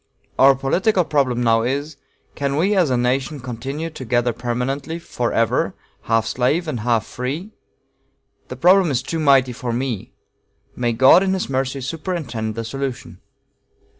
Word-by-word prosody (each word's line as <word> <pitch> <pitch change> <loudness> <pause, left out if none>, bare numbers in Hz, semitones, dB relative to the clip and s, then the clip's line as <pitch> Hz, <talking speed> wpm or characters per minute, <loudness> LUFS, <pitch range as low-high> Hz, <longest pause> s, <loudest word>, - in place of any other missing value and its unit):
Our 135 0 +7
political 180 - +1
problem 130 -5 +1
now 115 -1 +3
is, 140 +5 -3 0.4
'Can 140 -1 -2
we 190 +7 +2
as 180 -6 +3
a 125 - +1
nation 130 +4 -1
continue 135 +6 -5
together 120 -4 -1
permanently 125 +7 -3
forever 120 -8 -1 0.3
half 115 -1 +3
slave 145 +10 0
and 130 -6 -3
half 115 -1 +1
free?' 145 - -5 1.0
The - - -7
problem 185 0 +4
is 130 -3 0
too 165 +4 -3
mighty 135 -4 +4
for 120 0 -4
me 120 -3 -3 0.6
may 120 -1 0
God, 130 +9 +6
in 190 -1 +1
his 185 - -3
mercy, 130 +1 -1
superintend 130 - -4
the 115 - -3
solution." 125 -8 -5
130 Hz, 145 wpm, -21 LUFS, 120-155 Hz, 1.0 s, Our